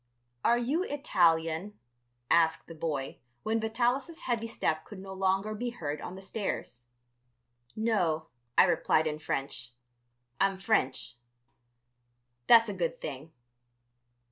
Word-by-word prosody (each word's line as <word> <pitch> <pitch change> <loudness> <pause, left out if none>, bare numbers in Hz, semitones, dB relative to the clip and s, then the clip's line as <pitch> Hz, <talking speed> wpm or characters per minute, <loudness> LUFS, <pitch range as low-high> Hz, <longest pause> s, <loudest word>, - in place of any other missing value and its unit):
"Are 235 - +4
you 265 +8 0
Italian?" 175 - +1 0.5
asked 165 -1 +4
the 165 - -10
boy, 155 -4 -3 0.2
when 225 +1 +1
Vitalis' 245 +8 0
heavy 230 -2 -1
step 160 -8 -1
could 210 - -11
no 190 0 -8
longer 190 +2 +1
be 240 +3 -3
heard 150 -10 -4
on 185 - -6
the 190 - -9
stairs. 190 - -4 0.9
"No," 180 -8 +1 0.3
I - - +9
replied 165 -3 +3
in 155 -1 -2
French, 135 -4 -3 0.7
"I'm 195 0 +2
French." 130 - 0 1.3
"That's 230 -1 +8
a 205 - -3
good 175 -3 -2
thing." 145 +2 -6
190 Hz, 120 wpm, -30 LUFS, 155-225 Hz, 1.3 s, I